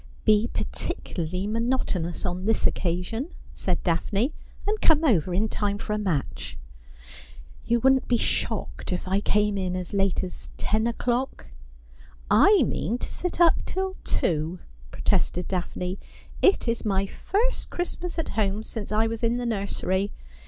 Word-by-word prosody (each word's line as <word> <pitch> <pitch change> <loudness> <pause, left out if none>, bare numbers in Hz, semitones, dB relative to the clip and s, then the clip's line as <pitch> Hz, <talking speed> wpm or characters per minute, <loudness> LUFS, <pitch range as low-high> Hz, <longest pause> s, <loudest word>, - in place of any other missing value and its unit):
' - - -25
Be 215 +1 +4
particularly 180 +2 -3
monotonous 215 -6 -1
on 180 +1 -2
this 225 +1 +2
occasion,' 180 - 0 0.3
said 180 -2 -1
Daphne, 200 - +1 0.2
' - - -15
and 425 +1 0
come 320 -1 +5
over 185 - +3
in 200 +5 +2
time 205 -1 -1
for 210 - -3
a 210 - 0
match.' 180 -9 -2 0.5
' 65 -1 -17
You 235 0 +3
wouldn't 265 +1 +4
be 240 - +3
shocked - - -1
if 180 +1 -2
I 190 +2 +2
came 210 -1 +2
in 185 -1 -1
as 185 +2 -4
late 195 -2 +2
as 185 - -6
ten 220 +2 +1
o'clock? 245 +2 -1 0.3
' - - -24
' - - -16
I 390 - +7
mean 235 - -1
to - - -4
sit 360 -1 -4
up 345 -1 +5
till 380 0 -2
two,' 160 +2 0 0.3
protested 180 0 0
Daphne. 180 0 -3 0.2
' - - -17
It 395 - -8
is 230 0 0
my 195 -2 +1
first 445 - -1
Christmas 350 0 -3
at 325 - -2
home, 210 0 0
since 220 -2 -6
I 215 +1 +3
was 225 0 -2
in 235 0 +2
the 245 - -2
nursery. 200 -2 -1
210 Hz, 165 wpm, -26 LUFS, 185-240 Hz, 0.5 s, I